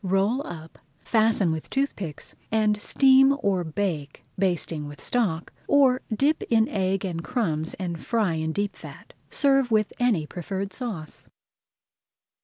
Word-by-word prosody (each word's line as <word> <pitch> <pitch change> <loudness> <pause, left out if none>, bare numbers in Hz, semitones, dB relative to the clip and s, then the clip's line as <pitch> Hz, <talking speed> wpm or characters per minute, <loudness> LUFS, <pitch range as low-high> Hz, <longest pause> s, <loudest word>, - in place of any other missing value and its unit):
Roll 195 +7 +1
up, 160 -1 -9 0.2
fasten 220 -5 +2
with 160 -1 -5
toothpicks, 205 - -3 0.2
and 215 -1 +2
steam 270 +3 +5
or 190 -3 +1
bake, 160 -4 -3
basting 175 -5 -1
with 145 0 -10
stock, 190 -10 -1
or 270 -3 +4
dip 280 +8 +2
in 225 -1 +4
egg 195 0 -1
and 170 -3 -4
crumbs 160 -5 -2
and 175 -4 -5
fry 220 -7 +1
in 160 0 -2
deep 205 +4 -2
fat. - - -12 0.2
Serve 275 -3 +3
with 215 -2 +1
any 225 -11 +2
preferred 190 +4 -5
sauce. 195 -10 -6
195 Hz, 135 wpm, -25 LUFS, 165-235 Hz, 0.2 s, steam